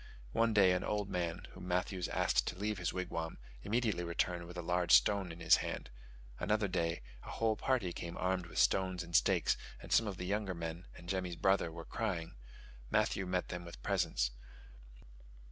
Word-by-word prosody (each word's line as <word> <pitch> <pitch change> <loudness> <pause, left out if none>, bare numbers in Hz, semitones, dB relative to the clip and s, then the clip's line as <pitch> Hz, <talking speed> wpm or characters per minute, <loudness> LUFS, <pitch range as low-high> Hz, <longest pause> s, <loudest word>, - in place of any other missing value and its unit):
One 115 - +3
day 100 -4 +6
an 90 - +1
old 105 -1 -1
man, 85 0 -2
whom - - -9
Matthews 90 0 0
asked - - +1
to 90 - -3
leave 105 0 -2
his 90 - 0
wigwam, 85 -3 -3 0.2
immediately 110 - 0
returned 85 0 -1
with 90 +1 -9
a 90 - -3
large 90 0 +1
stone 90 +10 +5
in 80 - -10
his - - +7
hand: - - -4 0.5
another 105 -1 +1
day 85 -5 -1 0.2
a - - -10
whole 110 -1 +1
party 105 -6 0
came 85 0 -6
armed 90 -1 0
with 80 - -10
stones 95 -1 +3
and 85 0 -6
stakes, - - +4 0.2
and - - -11
some 115 - +5
of 100 -3 -4
the 90 - -4
younger 100 -1 -1
men 85 +2 -5
and 85 - -12
Jemmy's 90 -2 -2
brother 95 -1 +2
were 85 0 -8
crying: 85 0 -3 0.6
Matthews 95 -1 +1
met 90 0 0
them 90 -1 -4
with 85 0 -10
presents. - - +1
90 Hz, 185 wpm, -35 LUFS, 85-100 Hz, 0.6 s, his